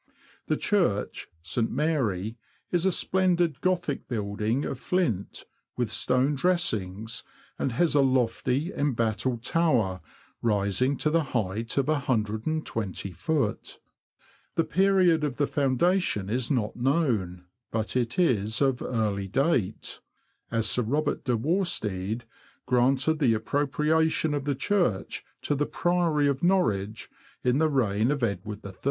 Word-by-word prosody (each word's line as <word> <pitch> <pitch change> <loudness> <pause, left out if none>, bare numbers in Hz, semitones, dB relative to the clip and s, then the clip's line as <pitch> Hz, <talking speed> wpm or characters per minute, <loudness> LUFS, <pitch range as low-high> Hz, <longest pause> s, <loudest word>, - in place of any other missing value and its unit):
The - - +1
Church 175 - 0 0.2
(St. 115 +7 -1
Mary) 115 - 0 0.4
is 175 +1 +2
a - - +3
splendid 175 -5 +1
Gothic 175 -6 -1
building 110 +3 -1
of 130 - -4
flint, 145 - -1 0.3
with 120 -3 -1
stone 130 +5 +1
dressings, 115 - -1 0.4
and 130 - -1
has 165 +7 +2
a 145 - +5
lofty, 130 - +1
embattled 120 -3 0
tower, 120 - +1 0.4
rising 105 +5 +1
to 150 - 0
the 165 0 +3
height 110 +4 -3
of 140 - +3
120ft. 115 - -2 0.8
The 165 - +3
period 185 -3 +3
of 140 -4 -2
the 145 - +2
foundation 140 - +1
is 120 0 -1
not 120 -7 0
known, 120 - 0 0.2
but 110 +1 -2
it 120 0 0
is 115 - +2
of 135 -3 +2
early 105 -5 -1
date, 110 - 0 0.5
as 115 -1 +1
Sir 125 - +1
Robert 145 +6 -1
de 125 -3 +1
Worstede 115 - -1 0.4
granted 130 +5 +2
the 120 -7 +3
appropriation 150 +5 +1
of 145 -2 -2
the 145 -1 0
church 155 - 0 0.2
to - - 0
the 145 +1 0
Priory 170 -4 +1
of 140 0 0
Norwich, 110 - +1 0.4
in 125 +2 +2
the 160 0 +3
reign 115 -5 +1
of 140 -3 -1
Edward 105 -1 -3
III. 100 - -7
130 Hz, 130 wpm, -27 LUFS, 110-155 Hz, 0.8 s, a